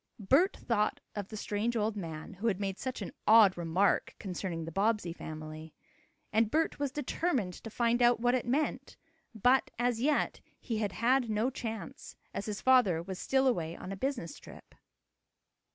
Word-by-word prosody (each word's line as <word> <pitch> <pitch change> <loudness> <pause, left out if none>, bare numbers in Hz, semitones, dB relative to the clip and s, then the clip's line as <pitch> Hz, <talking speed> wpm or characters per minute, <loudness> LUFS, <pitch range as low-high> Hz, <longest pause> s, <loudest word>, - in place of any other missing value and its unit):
Bert 275 - +3
thought 210 -3 0
of 205 -2 -4
the 215 - -7
strange 210 +3 -1
old 215 0 0
man, 165 -2 -6
who 200 +5 -3
had 200 -4 +1
made 195 -1 -3
such 255 -4 -4
an - - -6 0.2
odd 215 -3 +7
remark 175 +3 +1
concerning 180 -4 -4
the 165 - -6
Bobbsey 200 -1 +1
family. 155 -1 -8 0.6
And 220 0 +3
Bert 320 +4 0
was 285 -2 -1
determined 260 - -1
to 225 - -6
find 235 +2 +1
out 240 -1 +5
what 245 +1 +2
it 255 -2 0
meant, 285 +5 -1 0.4
but, 250 +5 +3
as 240 -1 0
yet, 295 +3 +1 0.2
he 225 -4 -3
had 205 -3 -1
had 245 +1 +2
no 220 +4 +1
chance, 225 -8 -6 0.2
as 200 - -4
his 205 -2 -4
father 240 -11 +4
was 190 +1 -6
still 265 0 +2
away 170 -10 0
on 185 - -8
a - - -3
business 235 - -3
trip. - - -14
215 Hz, 175 wpm, -31 LUFS, 190-245 Hz, 0.6 s, odd